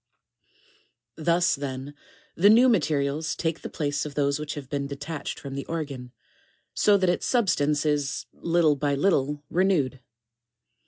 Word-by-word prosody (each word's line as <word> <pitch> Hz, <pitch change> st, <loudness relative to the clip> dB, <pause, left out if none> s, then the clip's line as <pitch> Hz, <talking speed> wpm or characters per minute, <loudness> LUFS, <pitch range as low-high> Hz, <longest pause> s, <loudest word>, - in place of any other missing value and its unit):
4. 155 Hz, -, -8 dB
Thus, 175 Hz, +1 st, +3 dB
then, 135 Hz, 0 st, -5 dB, 0.4 s
the 200 Hz, +4 st, +5 dB
new 235 Hz, +4 st, +7 dB
materials 155 Hz, -, +1 dB
take 165 Hz, -1 st, -2 dB
the -, -, -6 dB
place 145 Hz, -2 st, -2 dB
of 150 Hz, -2 st, -7 dB
those 140 Hz, 0 st, +1 dB
which 150 Hz, -1 st, -5 dB
have 145 Hz, -3 st, -7 dB
been 140 Hz, 0 st, -3 dB
detached 145 Hz, +2 st, -6 dB
from 140 Hz, -1 st, -8 dB
the 140 Hz, 0 st, -5 dB
organ, 140 Hz, -7 st, -5 dB, 0.6 s
so 205 Hz, -1 st, +4 dB
that 190 Hz, -1 st, +1 dB
its 175 Hz, -, 0 dB
substance 150 Hz, -, +1 dB
is, 145 Hz, -3 st, -1 dB
little 165 Hz, -3 st, +2 dB
by 145 Hz, 0 st, 0 dB
little, 145 Hz, -3 st, +1 dB
renewed. 165 Hz, -9 st, +1 dB
150 Hz, 150 wpm, -26 LUFS, 140-170 Hz, 0.6 s, new